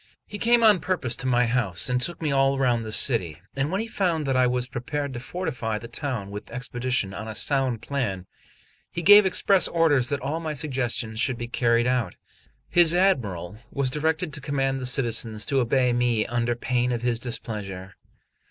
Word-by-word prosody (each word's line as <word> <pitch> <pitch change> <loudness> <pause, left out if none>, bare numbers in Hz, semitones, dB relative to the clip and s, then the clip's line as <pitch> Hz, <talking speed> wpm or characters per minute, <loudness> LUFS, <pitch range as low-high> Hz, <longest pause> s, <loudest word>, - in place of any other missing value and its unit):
He 205 - -8
came 235 +1 +3
on 210 -4 +6
purpose 160 -8 0
to 125 - -4
my 125 -1 +3
house, 115 -8 0
and 125 0 0
took 170 +4 -3
me 150 - 0
all 135 0 +2
round 120 -3 +1
the 110 - -6
city; 90 - +3 0.2
and 135 +2 -1
when 195 +3 -1
he - - -4
found 175 -8 -1
that 135 -1 0
I 130 0 +4
was 125 0 -1
prepared 140 +3 -4
to 120 - -5
fortify 125 -7 -4
the 115 +2 -9
town 120 -5 -4
with 105 +1 -8
expedition 125 -4 -2
on 105 +3 -7
a 110 - -6
sound 130 -3 0
plan, 115 -10 -3 0.6
he 170 - -5
gave 205 +2 +8
express 190 0 +3
orders 150 -7 +2
that 145 - -1
all 145 +5 -3
my 155 -2 -4
suggestions 120 -6 -1
should 125 0 +1
be 120 - -5
carried 120 0 +1
out. 125 -7 -1 0.5
His 175 -1 +4
Admiral 110 - 0
was 135 -2 -2
directed 160 +2 -1
to 150 - -7
command 135 -2 -1
the 130 - -3
citizens 115 -4 0
to 140 - +1
obey 125 0 +2
me 120 -3 +1
under 120 0 -1
pain 125 +1 -1
of 120 -1 -3
his 120 -2 0
displeasure. 100 -6 -5
125 Hz, 195 wpm, -25 LUFS, 115-145 Hz, 0.6 s, gave